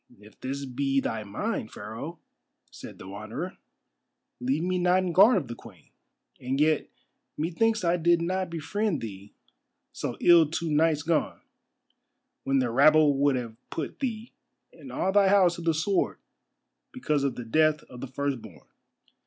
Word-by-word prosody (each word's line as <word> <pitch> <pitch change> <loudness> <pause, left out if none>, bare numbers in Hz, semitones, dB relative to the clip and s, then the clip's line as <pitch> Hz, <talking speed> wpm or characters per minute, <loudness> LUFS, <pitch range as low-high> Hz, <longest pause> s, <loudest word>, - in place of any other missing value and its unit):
"If 105 +1 -18
this 140 +2 -4
be 135 +1 0
thy 110 -4 -3
mind, 110 - -4
Pharaoh," 115 +11 -7 0.5
said - - -11
the 95 - -11
Wanderer, 110 - -6 0.8
"leave 135 +6 -1
me 180 0 0
not 180 +1 +3
in 180 -2 -2
guard 210 +6 +7
of 150 -8 -2
the 120 - -5
Queen. 100 -9 -15 0.5
And 130 +2 -2
yet 155 0 +2 0.5
methinks 215 +8 0
I 170 0 +2
did 170 0 +3
not 185 +2 -2
befriend 170 +3 -2
thee 100 -2 -9 0.6
so - - -4
ill 170 -3 +6
two 165 0 -3
nights 150 0 +2
gone, 165 -1 -1 1.0
when 135 0 +2
the 125 -3 +1
rabble 150 +3 +5
would 140 -1 +3
have 120 -3 -4
put 155 - -5
thee 235 -4 -4 0.4
and - - -12
all 190 - 0
thy 200 0 +4
house 190 -3 +4
to - - -7
the 165 0 +2
sword 190 +5 0 0.7
because 150 - -1
of 135 -3 -1
the 120 - -7
death 155 +5 +2
of 125 -1 -12
the 135 - -5
firstborn." 125 - -5
155 Hz, 160 wpm, -27 LUFS, 125-175 Hz, 1.0 s, guard